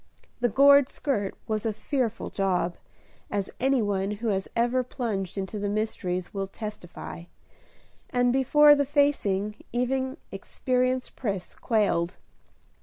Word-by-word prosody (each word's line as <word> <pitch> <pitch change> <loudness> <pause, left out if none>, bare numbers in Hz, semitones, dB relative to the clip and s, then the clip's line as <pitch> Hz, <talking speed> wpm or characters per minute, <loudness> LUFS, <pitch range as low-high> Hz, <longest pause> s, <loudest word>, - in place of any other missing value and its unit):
The 245 0 +2
gored 280 +2 +6
skirt 210 -9 -2
was 215 -1 -1
a 225 - 0
fearful 235 +1 -2
job, 180 -3 0 0.5
as 200 -2 -2
any 265 -2 +2
one 195 -1 0
who 225 +1 -2
has 195 -2 -1
ever 240 +2 +2
plunged 210 -7 -3
into 195 +2 -3
the 205 0 -1
mysteries 185 -4 -2
will 195 -1 -2
testify; 195 -5 -8 0.8
and 245 0 +2
before 295 +3 +6
the 285 -1 +3
facing, 235 -8 +1
even 260 +3 -1
experienced 255 0 -1
Pris 200 -7 -3
quailed. 190 -6 +1
225 Hz, 125 wpm, -27 LUFS, 195-255 Hz, 0.8 s, gored